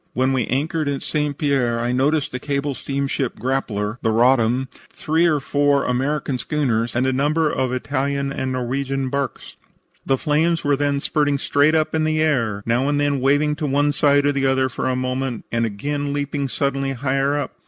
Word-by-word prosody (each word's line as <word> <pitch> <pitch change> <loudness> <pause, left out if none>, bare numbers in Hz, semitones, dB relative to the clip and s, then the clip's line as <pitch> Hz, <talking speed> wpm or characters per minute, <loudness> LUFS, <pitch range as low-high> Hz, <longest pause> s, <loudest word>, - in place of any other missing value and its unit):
"When 130 +1 +1
we 125 -4 0
anchored 150 +3 -1
at 140 -1 -3
St. 150 -2 -1
Pierre 130 -5 +1
I 120 +1 -1
noticed 140 +4 +1
the 125 - -4
cable 140 +1 -2
steamship 135 -1 -3
Grappler, 120 -4 -2
the - - +1
Roddam, 120 +2 +3 0.2
three 160 +3 +1
or 155 -3 +2
four 145 0 +1
American 135 +1 -1
schooners 120 -5 -1
and 125 +2 +1
a 130 - +1
number 150 +4 +1
of 130 -1 -1
Italian 140 +1 -1
and 130 -1 -3
Norwegian 135 +1 -2
barks. 140 -1 -4 0.5
The 135 - +1
flames 160 +3 +1
were 145 0 +2
then 140 0 0
spurting 145 -1 +1
straight 145 +3 +2
up 155 -1 +1
in 160 -1 +1
the 155 0 +1
air, 115 -10 0
now 120 +4 +1
and 145 0 +1
then 145 -1 +1
waving 145 +3 +2
to 150 - -2
one 145 +2 +2
side 145 0 +3
or 145 - +3
the 135 -1 0
other 130 0 +2
for 130 - -2
a 130 - 0
moment 130 -1 -3
and 115 0 +1
again 145 +7 -3
leaping 145 -1 -2
suddenly 135 0 -1
higher 135 +2 0
up. 145 - -3
140 Hz, 190 wpm, -21 LUFS, 130-145 Hz, 0.5 s, Roddam